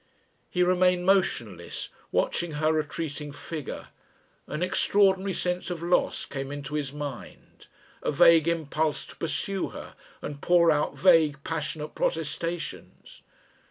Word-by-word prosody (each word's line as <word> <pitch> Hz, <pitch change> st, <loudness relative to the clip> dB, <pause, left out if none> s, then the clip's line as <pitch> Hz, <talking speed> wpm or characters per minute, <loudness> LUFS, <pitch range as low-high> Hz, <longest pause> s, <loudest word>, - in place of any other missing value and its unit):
He 180 Hz, -, +2 dB
remained 180 Hz, 0 st, +3 dB
motionless, 120 Hz, -, 0 dB, 0.2 s
watching 170 Hz, -2 st, 0 dB
her 155 Hz, +1 st, +1 dB
retreating 150 Hz, -1 st, -3 dB
figure. 150 Hz, 0 st, -7 dB, 0.6 s
An 155 Hz, +4 st, -3 dB
extraordinary 190 Hz, +1 st, +3 dB
sense 180 Hz, 0 st, -1 dB
of 170 Hz, -2 st, -4 dB
loss 175 Hz, +1 st, +1 dB
came 135 Hz, -1 st, -5 dB
into 145 Hz, 0 st, -6 dB
his 145 Hz, -3 st, -2 dB
mind, 145 Hz, -3 st, -8 dB, 0.3 s
a -, -, 0 dB
vague 165 Hz, +2 st, +6 dB
impulse 160 Hz, -2 st, 0 dB
to -, -, -13 dB
pursue 190 Hz, +4 st, -2 dB
her -, -, -9 dB, 0.3 s
and 145 Hz, -1 st, -7 dB
pour 170 Hz, -2 st, +5 dB
out 150 Hz, -1 st, 0 dB
vague 160 Hz, -5 st, +4 dB
passionate 155 Hz, -1 st, -4 dB
protestations.... 165 Hz, +1 st, -4 dB
160 Hz, 125 wpm, -27 LUFS, 150-180 Hz, 0.6 s, vague